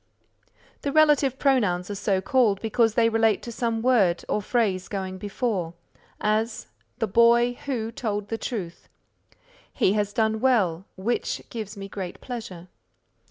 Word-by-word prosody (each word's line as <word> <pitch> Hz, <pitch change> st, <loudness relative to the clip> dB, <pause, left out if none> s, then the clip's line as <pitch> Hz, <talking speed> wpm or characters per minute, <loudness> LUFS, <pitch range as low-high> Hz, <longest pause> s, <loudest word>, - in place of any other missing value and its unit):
The 280 Hz, -, -2 dB
Relative 295 Hz, -3 st, +4 dB
Pronouns 205 Hz, -10 st, +1 dB
are -, -, -2 dB
so 195 Hz, -1 st, 0 dB
called 215 Hz, -2 st, +2 dB
because 225 Hz, 0 st, +1 dB
they 230 Hz, -1 st, +4 dB
relate 225 Hz, -2 st, +2 dB
to 235 Hz, -, -6 dB
some 230 Hz, -1 st, -2 dB
word 210 Hz, -9 st, +3 dB
or 210 Hz, -, 0 dB
phrase 200 Hz, -4 st, 0 dB
going 190 Hz, -2 st, -4 dB
before; 195 Hz, -4 st, -2 dB, 0.4 s
as, 220 Hz, +2 st, 0 dB, 0.3 s
"The 225 Hz, -, 0 dB
boy 235 Hz, +3 st, +4 dB
who 230 Hz, -5 st, -2 dB
told 210 Hz, -3 st, -3 dB
the 225 Hz, -, -2 dB
truth;" 185 Hz, -9 st, -5 dB, 0.8 s
"He 190 Hz, -, +2 dB
has 205 Hz, -1 st, 0 dB
done 220 Hz, 0 st, +1 dB
well, 200 Hz, -9 st, +2 dB
which 225 Hz, +6 st, -2 dB
gives 215 Hz, -3 st, -6 dB
me 195 Hz, 0 st, -6 dB
great 185 Hz, -2 st, -6 dB
pleasure." 195 Hz, -8 st, -7 dB
220 Hz, 145 wpm, -25 LUFS, 195-235 Hz, 0.8 s, Relative